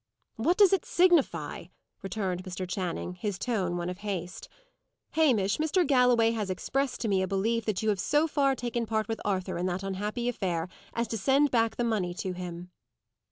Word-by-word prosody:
"What 320 +11 +2
does 400 -2 +6
it 385 - +2
signify?" 295 - +2 0.4
returned 190 -2 -3
Mr. 185 0 -5
Channing, 180 -1 -3
his 190 +2 -3
tone 190 -8 -1
one 175 0 -3
of 180 +1 -5
haste. 190 -4 -5 0.6
"Hamish, 240 -12 +3
Mr. 320 +3 +2
Galloway 250 -4 +4
has 215 -4 -2
expressed 265 +8 -2
to 230 - -1
me 195 -2 +2
a 190 - 0
belief 220 +4 0
that 215 -1 -1
you 220 - +2
have 205 -3 +1
so 295 - +2
far 280 -3 +2
taken 240 -1 -3
part 220 -1 0
with 225 -1 -3
Arthur 190 -4 -1
in 180 - 0
that 185 +1 -2
unhappy 210 +5 -3
affair, 180 -7 -1 0.3
as 235 0 0
to 225 - -2
send 275 +7 +3
back 225 -2 +2
the 240 - -1
money 200 -7 -1
to 185 - -3
him." 180 0 -7
210 Hz, 190 wpm, -29 LUFS, 185-245 Hz, 0.6 s, does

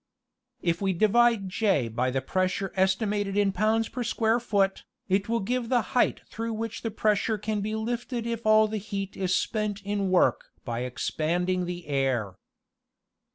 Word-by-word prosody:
If 170 0 0
we 195 -1 +1
divide 215 +2 +3
J 185 - +1
by 120 +3 -1
the 135 +1 -2
pressure 185 +4 -1
estimated 195 +1 +1
in 200 -1 +3
pounds 220 +2 +1
per 250 - -5
square 230 0 +1
foot, 200 -5 0 0.2
it 195 +2 +1
will 230 0 +1
give 240 +3 -2
the 245 -3 +3
height 250 - +2
through 230 +1 -4
which 225 0 -4
the 225 - -2
pressure 215 0 +1
can 210 0 -2
be 215 +2 -2
lifted 235 +1 -3
if 235 -1 -3
all 215 0 +5
the 215 0 -3
heat 195 -1 -5
is 185 -1 0
spent 215 -2 -1
in 200 -1 -1
work 185 -1 +3 0.2
by 115 -1 -3
expanding 175 +8 -1
the 175 -1 -5
air. 135 -8 0
205 Hz, 165 wpm, -27 LUFS, 185-225 Hz, 0.2 s, all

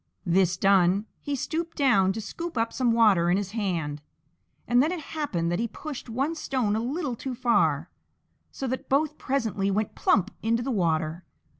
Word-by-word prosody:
This 180 0 +2
done, 195 +1 +3
he 285 - -3
stooped 330 +5 -3
down 235 - +4
to 220 - -4
scoop 335 +8 -6
up 225 0 0
some 250 -3 +2
water 210 -7 +4
in 180 - +3
his 200 -1 -3
hand, 170 -9 -2 0.7
and 245 +1 +4
then 305 +5 +2
it 360 - -3
happened 280 - -2
that 175 - 0
he 235 - 0
pushed 275 +2 -8
one 270 +8 -1
stone 255 -9 -1
a - - 0
little 265 +2 -2
too 255 +2 -5
far, 240 -1 +1 0.6
so 270 - -5
that 260 0 -4
both 300 +2 +1
presently 220 -8 -1
went 210 +2 -1
plump 205 +1 +2
into 230 +2 +1
the 270 - -2
water. 165 -4 0
230 Hz, 180 wpm, -26 LUFS, 190-270 Hz, 0.7 s, down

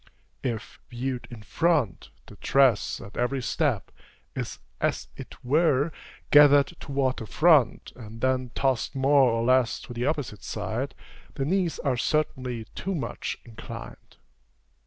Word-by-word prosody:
If, 115 -5 -4
viewed 125 +1 -4
in 115 -3 -10
front, 150 - 0 0.2
the - - -13
dress, 135 -6 +3
at 100 - -11
every 125 +2 0
step, - - 0 0.4
is - - -4 0.2
as - - -1
it - - -11
were, 150 +1 +3 0.4
gathered 145 +2 +7
toward 135 -3 -1
the 110 - -6
front, 155 -7 +3
and 115 -2 -10
then 130 0 0
tossed 130 -3 0
more 135 -1 +4
or 115 0 0
less 130 -1 +3
to 120 - -9
the 120 +2 -2
opposite 145 -9 -2
side, 110 +6 -3 0.4
the 135 - -1
knees 180 +1 0
are 130 -4 -1
certainly 130 -5 -1
too 195 +1 -3
much 155 - -4
inclined. 115 -2 -10
130 Hz, 135 wpm, -26 LUFS, 120-145 Hz, 0.4 s, gathered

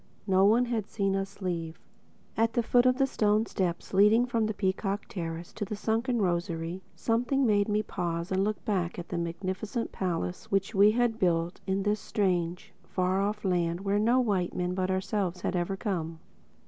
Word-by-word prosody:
No 190 -1 +4
one 230 +4 +5
had 225 -4 -2
seen 195 -2 0
us 195 0 -4
leave. 165 -3 -3 0.6
At 225 +1 +2
the 240 - +1
foot 245 +2 +4
of 255 0 +3
the 270 - +4
stone 215 -4 +2
steps 180 -5 -3
leading 210 +5 +5
from 230 -3 0
the 220 - -2
Peacock 195 +1 -1
Terrace 170 -2 -5
to 220 - -4
the 210 +1 -4
Sunken 230 +4 0
Rosary, 170 0 -2
something 245 +8 +1
made 205 -2 +3
me 210 +1 +1
pause 170 -3 -3
and 190 +1 +2
look 210 +1 -2
back 185 -6 -1
at 175 - -7
the - - -3
magnificent 185 +7 -3
palace 165 - -3
which 195 +2 0
we 200 +1 +6
had 230 0 +1
built 170 -1 +1
in 195 +1 0
this 210 +1 +1
strange, 180 -4 -1
far 185 +1 0
off 210 +1 -2
land 175 -1 0
where 200 +1 +1
no 235 +4 +3
white 200 -8 0
men 180 0 -1
but 185 0 -1
ourselves 190 -1 -1
had - - -1
ever 180 +2 -1
come. 170 -6 -3
195 Hz, 185 wpm, -29 LUFS, 180-215 Hz, 0.6 s, we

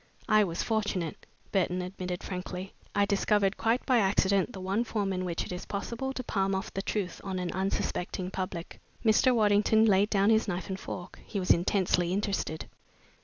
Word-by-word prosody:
"I 215 -2 +5
was 170 -4 -2
fortunate," 205 -7 -2 0.2
Burton 180 -2 +1
admitted 180 -1 -5
frankly. 185 0 -5 0.2
"I 205 - +4
discovered 200 0 +2
quite 230 +3 +1
by 255 -3 +4
accident 195 +1 +2
the 195 - -8
one 195 +5 0
form 205 -4 -1
in 185 0 -2
which 170 -2 -2
it - - -8
is 180 - -6
possible 235 +6 -3
to 255 - -4
palm 195 -4 0
off 190 - -4
the 195 - -2
truth 195 -3 -3
on 190 -2 -3
an 180 -1 -2
unsuspecting 185 -1 -2
public." 185 -3 -5 0.2
Mr. 220 +4 +5
Waddington 215 0 +4
laid 205 -1 +4
down 200 +1 +3
his 220 0 +3
knife 185 0 -3
and 190 0 -3
fork. 180 -1 -7
He 205 - -3
was 180 - +2
intensely 180 -1 +2
interested. 195 -5 -2
195 Hz, 180 wpm, -29 LUFS, 185-210 Hz, 0.2 s, I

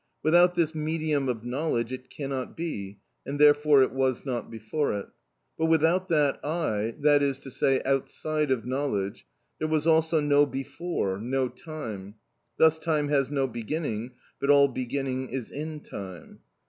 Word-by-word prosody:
Without 175 +3 +5
this 165 -2 +1
medium 155 -3 -1
of 115 -2 -3
knowledge 125 -2 -1
it 130 0 -8
cannot 135 -3 -5
be, 105 - -5 0.3
and 140 +2 -4
therefore 145 -1 +6
it - - 0
was 130 -1 0
not 125 -3 -3
before 115 +5 -2
it. 100 - -6 0.5
But 160 - +2
without 165 +4 +3
that 150 -4 +2
eye, 115 -9 -1
that 145 0 +5
is 140 -2 +1
to 135 - -9
say, 135 +1 +1
outside 150 +2 -1
of 125 -4 0
knowledge, 125 -7 -2 0.3
there 155 - 0
was 155 -1 +1
also 160 0 +3
no 145 0 +4
before, 135 - -3
no 130 +3 -1
time. 115 - -8 0.4
Thus 160 0 +5
time 155 -3 0
has 135 -3 +2
no 140 -2 +1
beginning, 120 -1 -4 0.3
but 140 - -1
all 140 -1 +6
beginning 130 +1 -3
is 130 -3 -5
in 155 +1 -5
time. 95 - -9
140 Hz, 160 wpm, -27 LUFS, 125-155 Hz, 0.5 s, therefore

